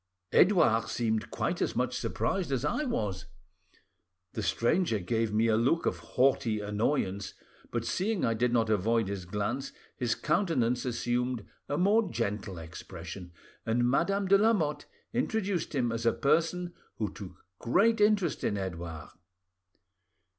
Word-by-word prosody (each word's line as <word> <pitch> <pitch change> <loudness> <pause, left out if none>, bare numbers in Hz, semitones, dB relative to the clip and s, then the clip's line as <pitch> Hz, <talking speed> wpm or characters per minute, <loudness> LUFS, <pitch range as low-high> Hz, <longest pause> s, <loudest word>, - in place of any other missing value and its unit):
"Edouard 135 - +4
seemed 110 -2 -1
quite - - -2
as - - 0
much - - 0
surprised 185 -7 -1
as 135 +1 0
I 300 - 0
was. 100 - -2 1.1
The 110 - -3
stranger 120 - +1
gave 110 +3 -1
me 110 +2 +2
a 110 -1 +3
look 130 +9 +2
of - - 0
haughty 125 -4 +1
annoyance, 105 -1 -1 0.3
but 115 -1 -2
seeing 200 - 0
I 115 - +2
did 120 +2 +1
not 115 -2 +2
avoid 110 +1 +1
his 100 -3 -4
glance 105 +8 -3 0.2
his 120 -3 0
countenance 150 - +1
assumed 120 -1 -1 0.2
a 145 - 0
more 205 +3 +3
gentle 105 - -3
expression, 85 +2 -8 0.3
and 120 +2 +1
Madame 195 +9 +1
de 195 +1 +6
Lamotte 170 -10 +1 0.3
introduced 205 - -1
him 120 -4 +1
as 115 0 -1
a - - +4
person 170 +4 +1 0.2
who 105 -3 -3
took 95 -2 -11
great 220 - +3
interest 205 -6 +2
in 105 - 0
Edouard." 85 -4 -5
120 Hz, 140 wpm, -30 LUFS, 105-170 Hz, 1.1 s, de